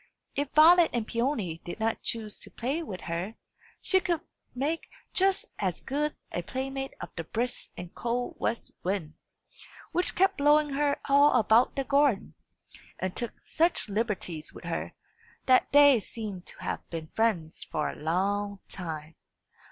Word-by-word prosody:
If 285 Hz, 0 st, -1 dB
Violet 335 Hz, +2 st, +8 dB
and 235 Hz, -3 st, 0 dB
Peony 230 Hz, -, -1 dB
did 175 Hz, -, -7 dB
not 225 Hz, 0 st, 0 dB
choose 220 Hz, -2 st, -4 dB
to -, -, -7 dB
play 270 Hz, +8 st, -2 dB
with 200 Hz, -, -6 dB
her, 175 Hz, +6 st, -3 dB, 0.5 s
she 380 Hz, -, +3 dB
could 345 Hz, -3 st, -1 dB, 0.3 s
make 295 Hz, +6 st, -1 dB, 0.2 s
just 385 Hz, 0 st, +3 dB
as 185 Hz, -4 st, -1 dB
good 295 Hz, +3 st, -2 dB, 0.2 s
a 175 Hz, -, -2 dB
playmate 270 Hz, +6 st, -4 dB
of -, -, -6 dB
the 165 Hz, -, -3 dB
brisk 240 Hz, +9 st, -2 dB
and 175 Hz, -1 st, -8 dB
cold 245 Hz, +1 st, -2 dB
west 230 Hz, -, -2 dB
wind, 180 Hz, -5 st, -2 dB, 0.8 s
which 355 Hz, -, +1 dB
kept 385 Hz, +1 st, +3 dB
blowing 295 Hz, +1 st, +5 dB
her 285 Hz, +1 st, +1 dB
all 285 Hz, +1 st, +6 dB
about 225 Hz, +2 st, +4 dB
the 275 Hz, -, 0 dB
garden, 280 Hz, -6 st, +2 dB, 0.6 s
and 185 Hz, -1 st, -3 dB
took 235 Hz, -2 st, -3 dB
such 335 Hz, -8 st, +1 dB
liberties 195 Hz, -7 st, -1 dB
with -, -, -12 dB
her, -, -, -4 dB, 0.5 s
that 255 Hz, -1 st, +4 dB
they 285 Hz, -3 st, +8 dB
seemed 205 Hz, -3 st, -7 dB
to -, -, -6 dB
have -, -, -4 dB
been 160 Hz, -2 st, -5 dB
friends 195 Hz, -9 st, 0 dB
for 150 Hz, -, -2 dB
a -, -, -4 dB
long 200 Hz, +5 st, 0 dB
time. 160 Hz, -4 st, -5 dB
235 Hz, 155 wpm, -29 LUFS, 185-285 Hz, 0.8 s, Violet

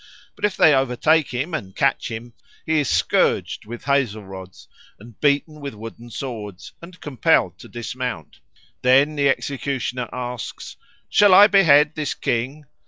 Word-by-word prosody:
But -, -, -2 dB
if 205 Hz, -2 st, -2 dB
they 155 Hz, -, +6 dB
overtake 135 Hz, +4 st, +2 dB
and 125 Hz, -, -4 dB
catch -, -, 0 dB
him 115 Hz, +1 st, -8 dB, 0.3 s
he 160 Hz, -1 st, +1 dB
is 145 Hz, -, -1 dB
scourged -, -, 0 dB
with 120 Hz, +1 st, -8 dB
hazel 125 Hz, -7 st, 0 dB
rods 95 Hz, -1 st, -11 dB, 0.3 s
or 105 Hz, -, -13 dB, 0.2 s
beaten 150 Hz, +1 st, +1 dB
with 140 Hz, -3 st, -6 dB
the -, -, -15 dB
wooden 115 Hz, +2 st, -10 dB
swords 110 Hz, -7 st, -7 dB
and 175 Hz, +1 st, -13 dB
compelled 105 Hz, -, +1 dB
to -, -, -12 dB
dismount. 120 Hz, -, -6 dB, 0.4 s
Then 135 Hz, +4 st, +4 dB
the 140 Hz, -1 st, +2 dB
executioner 130 Hz, -3 st, -3 dB
asks, 125 Hz, -1 st, -6 dB, 0.3 s
"Shall 205 Hz, -2 st, +5 dB
I 200 Hz, -, +9 dB
behead 150 Hz, -7 st, +5 dB
this 150 Hz, -3 st, -3 dB
King?" 130 Hz, +6 st, -3 dB
130 Hz, 150 wpm, -21 LUFS, 115-150 Hz, 0.4 s, I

